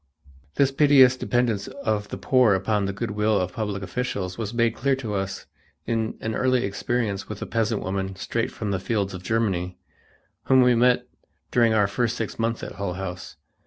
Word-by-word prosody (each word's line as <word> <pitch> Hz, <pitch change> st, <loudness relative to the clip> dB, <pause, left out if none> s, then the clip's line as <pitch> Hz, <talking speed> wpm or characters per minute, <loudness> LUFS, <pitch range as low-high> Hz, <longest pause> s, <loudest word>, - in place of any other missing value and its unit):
This 140 Hz, -1 st, +3 dB
piteous 135 Hz, -2 st, +6 dB
dependence 120 Hz, -5 st, 0 dB
of 105 Hz, -2 st, -2 dB
the -, -, -5 dB
poor 115 Hz, +1 st, +4 dB
upon 100 Hz, +2 st, 0 dB
the 100 Hz, -, -1 dB
good 100 Hz, +1 st, -4 dB
will 105 Hz, 0 st, +1 dB
of 90 Hz, 0 st, -2 dB
public 105 Hz, -3 st, -3 dB
officials 95 Hz, -2 st, -3 dB
was 110 Hz, -3 st, -4 dB
made 115 Hz, -1 st, +1 dB
clear 140 Hz, -1 st, +1 dB
to 115 Hz, -6 st, -5 dB
us 95 Hz, -1 st, -3 dB, 0.4 s
in 115 Hz, -1 st, -1 dB
an 110 Hz, -, -2 dB
early 130 Hz, 0 st, +2 dB
experience 100 Hz, 0 st, -2 dB
with 105 Hz, -1 st, -6 dB
a -, -, -4 dB
peasant 115 Hz, -1 st, -1 dB
woman 95 Hz, 0 st, -3 dB
straight 115 Hz, +4 st, -2 dB
from 105 Hz, -2 st, -4 dB
the 95 Hz, -, 0 dB
fields 100 Hz, -1 st, -1 dB
of 90 Hz, -, -7 dB
Germany, 95 Hz, -4 st, -1 dB, 0.7 s
whom 130 Hz, -1 st, +5 dB
we 125 Hz, 0 st, +5 dB
met 125 Hz, +1 st, +3 dB, 0.5 s
during 115 Hz, -2 st, +3 dB
our 105 Hz, -2 st, +4 dB
first 115 Hz, +3 st, -1 dB
six 115 Hz, 0 st, -4 dB
months 115 Hz, 0 st, -1 dB
at -, -, -5 dB
Hull 95 Hz, -3 st, -3 dB
House. 95 Hz, -1 st, -6 dB
110 Hz, 190 wpm, -24 LUFS, 95-120 Hz, 0.7 s, piteous